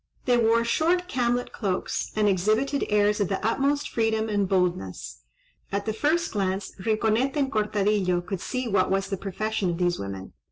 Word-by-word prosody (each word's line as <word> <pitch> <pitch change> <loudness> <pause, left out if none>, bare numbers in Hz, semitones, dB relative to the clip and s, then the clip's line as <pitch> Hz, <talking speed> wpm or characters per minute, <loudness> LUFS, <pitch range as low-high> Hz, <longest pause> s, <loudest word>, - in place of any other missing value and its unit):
They 245 - +4
wore 230 0 +3
short 345 +8 +1
camlet 245 -4 0
cloaks, 195 -4 -2
and 215 -1 +2
exhibited 215 +9 +1
airs 210 0 +3
of 200 - +1
the 195 - 0
utmost 280 +5 +1
freedom 225 -1 0
and 205 -2 0
boldness. 180 - -1 0.5
At 200 0 -2
the 220 - -1
first 320 +8 +1
glance 195 -1 -2
Rinconete 225 +4 +1
and 275 -2 +1
Cortadillo 205 -4 +1
could 180 0 -5
see 255 -1 -3
what 195 -4 +2
was 195 0 0
the - - +1
profession 200 +1 -2
of 170 - -2
these 175 -1 0
women. 95 -1 -6
215 Hz, 170 wpm, -26 LUFS, 195-240 Hz, 0.5 s, They